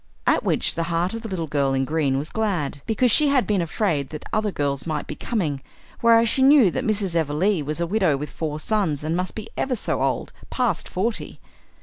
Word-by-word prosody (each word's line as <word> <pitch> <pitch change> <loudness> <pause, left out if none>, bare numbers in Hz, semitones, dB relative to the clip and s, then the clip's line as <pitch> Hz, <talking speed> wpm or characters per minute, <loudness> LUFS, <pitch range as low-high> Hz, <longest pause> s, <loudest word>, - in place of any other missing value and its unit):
At - - +3
which - - +1
the 165 - -2
heart 170 +3 0
of 230 - -4
the 225 - -6
Little 180 -4 -2
Girl 140 -3 0
in 135 0 +1
Green 145 -3 0
was 145 +3 -4
glad, 180 -11 -1
because 230 +2 +2
she 300 +6 +5
had 275 -3 +3
been 205 -4 +1
afraid 160 -5 -1
that 155 - -8
other 215 -1 +1
girls 140 -2 -2
might 155 -2 -2
be - - -6
coming, 155 - -2 0.4
whereas 230 0 +5
she 265 - +1
knew 265 -7 +6
that - - -2
Mrs. 205 -5 0
Everleigh 165 +4 +1
was 150 +3 -3
a 170 - +1
widow 180 -6 +2
with 145 0 -6
four 155 -2 -4
sons 165 -7 0
and 160 +2 -1
must 180 +1 -2
be 220 0 -6
ever 265 -2 -1
so 220 - -1
old, - - -1 0.2
past 240 -9 -1
forty. 215 +5 -3
175 Hz, 220 wpm, -23 LUFS, 150-220 Hz, 0.4 s, knew